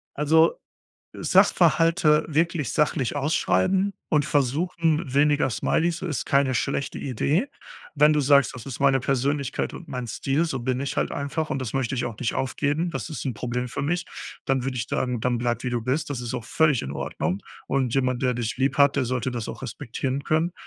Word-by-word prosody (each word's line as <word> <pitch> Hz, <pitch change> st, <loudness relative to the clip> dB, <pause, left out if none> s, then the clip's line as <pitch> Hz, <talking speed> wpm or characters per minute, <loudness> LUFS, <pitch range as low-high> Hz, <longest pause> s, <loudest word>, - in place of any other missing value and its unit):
Also, 160 Hz, +3 st, +4 dB, 0.6 s
äh, -, -, -8 dB
Sachverhalte 165 Hz, -1 st, +4 dB
wirklich 160 Hz, -1 st, 0 dB
sachlich 145 Hz, -4 st, 0 dB
ausschreiben 165 Hz, -, +1 dB, 0.2 s
und 150 Hz, -2 st, +3 dB
versuchen, 155 Hz, +3 st, +1 dB
weniger 145 Hz, 0 st, +3 dB
Smileys 165 Hz, +8 st, 0 dB
ist 160 Hz, -8 st, -3 dB
keine 140 Hz, -1 st, +2 dB
schlechte 140 Hz, +3 st, -2 dB
Idee. 145 Hz, -, 0 dB, 0.5 s
Wenn 150 Hz, +1 st, +5 dB
du 150 Hz, -, +2 dB
sagst: 140 Hz, 0 st, +4 dB
„Das 125 Hz, -3 st, -9 dB
ist 135 Hz, -3 st, -6 dB
meine 135 Hz, -1 st, +4 dB
Persönlichkeit 135 Hz, +1 st, -1 dB
und -, -, -10 dB
mein 125 Hz, -2 st, -4 dB
Stil, 135 Hz, +7 st, 0 dB
so 135 Hz, -6 st, -3 dB
bin 130 Hz, +1 st, -1 dB
ich 140 Hz, +1 st, -3 dB
halt -, -, 0 dB
einfach 145 Hz, +3 st, -2 dB
und 135 Hz, -, -1 dB
das 125 Hz, -4 st, -4 dB
möchte 135 Hz, -1 st, -1 dB
ich 125 Hz, -, -1 dB
auch 115 Hz, -3 st, -5 dB
nicht 120 Hz, -, -1 dB
aufgeben, 145 Hz, +6 st, -1 dB
das -, -, -4 dB
ist 155 Hz, -, -6 dB
'n 135 Hz, -, -1 dB
Problem 125 Hz, +2 st, -3 dB
für 125 Hz, -, -4 dB
mich.", 170 Hz, +4 st, -1 dB, 0.4 s
dann 135 Hz, -2 st, 0 dB
würd 135 Hz, 0 st, -2 dB
ich 120 Hz, -1 st, -2 dB
dann -, -, -2 dB
sagen: 125 Hz, -2 st, -1 dB
„Dann 120 Hz, +1 st, 0 dB
bleib 120 Hz, 0 st, -1 dB
wie 125 Hz, -, -1 dB
du 120 Hz, -1 st, -1 dB
bist." 130 Hz, +7 st, -1 dB
Das 135 Hz, -4 st, -3 dB
ist 120 Hz, 0 st, -4 dB
auch 120 Hz, -3 st, -4 dB
völlig 150 Hz, 0 st, +2 dB
in 70 Hz, -, -5 dB
Ordnung, 90 Hz, +6 st, -3 dB, 0.3 s
und 130 Hz, -4 st, 0 dB
jemand, 130 Hz, -2 st, 0 dB
der 125 Hz, -1 st, +2 dB
dich 120 Hz, -1 st, -3 dB
lieb 135 Hz, +1 st, +1 dB
hat, 140 Hz, 0 st, +5 dB
der 140 Hz, -, +2 dB
sollte 125 Hz, 0 st, -1 dB
das 120 Hz, -3 st, -4 dB
auch -, -, -7 dB
respektieren 130 Hz, +4 st, -4 dB
können. 160 Hz, +3 st, +1 dB
135 Hz, 205 wpm, -25 LUFS, 125-150 Hz, 0.6 s, Wenn